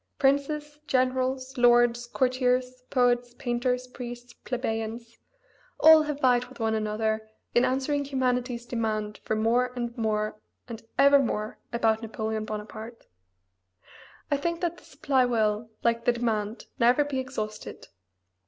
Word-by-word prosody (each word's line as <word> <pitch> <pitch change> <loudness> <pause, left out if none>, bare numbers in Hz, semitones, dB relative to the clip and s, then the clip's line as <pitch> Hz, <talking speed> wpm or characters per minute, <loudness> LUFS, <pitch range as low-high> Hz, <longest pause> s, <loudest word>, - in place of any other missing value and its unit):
Princes, 295 +2 0
generals, 260 0 0
lords, 240 0 +4
courtiers, 255 0 0
poets, 245 -1 +2
painters, 250 +1 -1
priests, 245 -1 -9
plebeians 230 -2 -4 0.6
all 315 0 +8
have 300 -2 -3
vied 250 -2 +3
with 255 +1 -15
one 225 -1 +1
another 220 0 -1 0.2
in 240 - +4
answering 270 +3 0
humanity's 250 -3 -1
demand 215 -3 -2
for 220 - -2
more 235 +3 +2
and 240 -1 -4
more 215 -2 -1 0.3
and 230 -2 -7 0.2
ever 280 +1 +7
more 215 -5 -2
about 225 -2 +1
Napoleon 220 -1 -3
Bonaparte. 215 +2 -7 1.3
I 285 - +3
think 335 +4 -2
that 345 -1 -1
the - - -21
supply 270 -1 +1
will, 220 -2 0
like 235 0 +1
the 245 - +4
demand, 225 -2 -2
never 245 +5 +5
be 285 -2 -3
exhausted. 215 -5 -6
245 Hz, 130 wpm, -27 LUFS, 225-260 Hz, 1.3 s, all